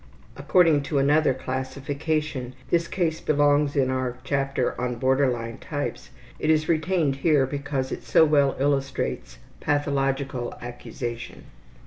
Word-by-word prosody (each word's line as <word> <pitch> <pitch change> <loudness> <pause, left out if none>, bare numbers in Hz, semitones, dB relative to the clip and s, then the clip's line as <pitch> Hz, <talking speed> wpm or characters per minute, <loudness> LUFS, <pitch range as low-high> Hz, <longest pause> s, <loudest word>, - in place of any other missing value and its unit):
(According 155 +1 +4
to 145 - 0
another 145 +2 +4
classification 135 +1 -3 0.2
this 170 0 +2
case 165 -4 -1
belongs 145 0 +2
in 130 -2 +2
our 130 -1 -2
chapter 135 -2 0
on 125 -1 -1
Border 130 +2 +2
line 115 -2 -4
Types. 145 -2 -5 0.3
It 155 - -1
is 155 -1 +3
retained 160 -3 +1
here 145 -1 +3
because 140 -1 -3
it - - -4
so 160 - +4
well 145 -3 +3
illustrates 135 0 -1 0.2
pathological 135 -3 -1
accusation.) 120 0 -7
140 Hz, 125 wpm, -25 LUFS, 130-150 Hz, 0.3 s, According